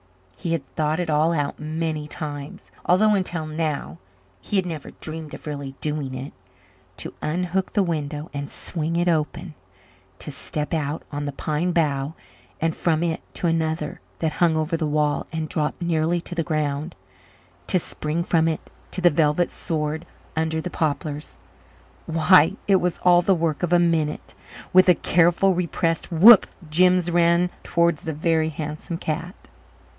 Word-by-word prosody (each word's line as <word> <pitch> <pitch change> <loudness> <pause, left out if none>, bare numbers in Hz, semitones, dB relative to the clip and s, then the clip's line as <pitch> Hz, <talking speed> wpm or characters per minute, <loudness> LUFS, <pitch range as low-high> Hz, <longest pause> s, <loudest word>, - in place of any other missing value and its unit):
He 165 - -3
had 145 -5 -3
thought 155 +1 0
it 170 -3 -1
all 155 +3 +3
out 145 -3 -2
many 155 0 -3
times, 145 -2 -6
although 210 +4 +4
until 180 -5 -1
now 155 - -3 0.4
he 205 - -4
had 190 -2 +3
never 160 -5 -5
dreamed 160 -1 -6
of - - -13
really 140 -3 -5
doing 145 -2 -3
it. 130 +2 -6 0.6
To - - -5
unhook 180 +4 -1
the 205 - +3
window 155 -2 -3
and 140 0 -4
swing 165 -1 -2
it 175 +1 +1
open, 160 +1 -1 0.6
to 150 - -6
step 150 +2 -4
out 150 -1 -2
on 145 0 -3
the 145 - -2
pine 155 +5 -1
bough 150 -3 0 0.4
and 165 0 0
from 165 -1 +1
it 165 0 -1
to - - -3
another 160 -2 -1 0.2
that 160 -2 0
hung 165 -1 +2
over 155 +2 0
the 160 -2 -1
wall 150 0 0
and 160 -1 -3
dropped 150 -1 -2
nearly 170 0 +1
to 175 - -8
the 170 - 0
ground, 155 0 -2 0.7
to 190 - +3
spring 160 -1 -3
from 165 -2 +2
it 160 -1 -3 0.2
to 185 - -3
the 175 -1 +6
velvet 150 +3 +2
sward 155 0 -3 0.3
under 160 0 0
the 180 +2 -4
poplars 150 -1 -3 0.7
why, 165 +2 +5
it 195 -1 +6
was 180 -1 -1
all 175 -1 +6
the 190 +2 +3
work 165 -3 -1
of 175 -2 -1
a 175 - +6
minute. 165 -3 0 0.4
With 185 0 +7
a 180 - +7
careful, 175 +4 +3
repressed 170 -1 -1
whoop 200 +7 +8 0.2
Jims 180 +1 +4
ran 170 +1 +3
towards 170 -2 +1
the 160 -3 -4
Very 160 +1 +1
Handsome 155 +2 -5
Cat. 165 +3 -4
160 Hz, 165 wpm, -23 LUFS, 150-175 Hz, 0.7 s, whoop